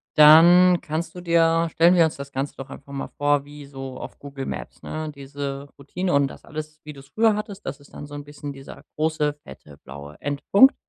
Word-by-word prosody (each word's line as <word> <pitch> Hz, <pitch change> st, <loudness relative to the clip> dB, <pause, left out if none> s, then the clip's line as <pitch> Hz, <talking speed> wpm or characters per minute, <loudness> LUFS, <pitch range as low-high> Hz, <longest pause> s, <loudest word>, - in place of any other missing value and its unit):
dann 175 Hz, +4 st, +8 dB
kannst 160 Hz, +2 st, -4 dB
du 180 Hz, -, -7 dB
dir 165 Hz, -1 st, +3 dB
stellen 170 Hz, +3 st, +5 dB
wir 170 Hz, -2 st, +6 dB
uns 160 Hz, -, -2 dB
das 140 Hz, 0 st, -9 dB
Ganze 135 Hz, +1 st, -4 dB
doch 135 Hz, -, -8 dB
einfach 140 Hz, 0 st, -12 dB
mal 135 Hz, -, -4 dB
vor 145 Hz, -1 st, +2 dB
wie 145 Hz, 0 st, -11 dB
so 135 Hz, -1 st, -8 dB
auf -, -, -9 dB
Google 140 Hz, -1 st, -7 dB
Maps, -, -, -7 dB
ne, 155 Hz, 0 st, -5 dB
diese 140 Hz, 0 st, -6 dB
Routine 175 Hz, +6 st, -3 dB
und 140 Hz, -1 st, +3 dB
das -, -, -12 dB
alles, 155 Hz, 0 st, -8 dB
wie 150 Hz, -, -9 dB
du’s 135 Hz, 0 st, -15 dB
früher 220 Hz, -1 st, +3 dB
hattest. 205 Hz, -1 st, -6 dB
Das 135 Hz, -, -5 dB
ist 145 Hz, -, -20 dB
dann -, -, -8 dB
so 145 Hz, -, -10 dB
’n 145 Hz, -, -6 dB
bisschen 145 Hz, 0 st, -8 dB
dieser 135 Hz, 0 st, -12 dB
große 155 Hz, -1 st, 0 dB
fette 70 Hz, +1 st, -14 dB
blaue 70 Hz, +2 st, -10 dB
Endpunkt. 170 Hz, -, +4 dB
145 Hz, 215 wpm, -23 LUFS, 140-165 Hz, -, dann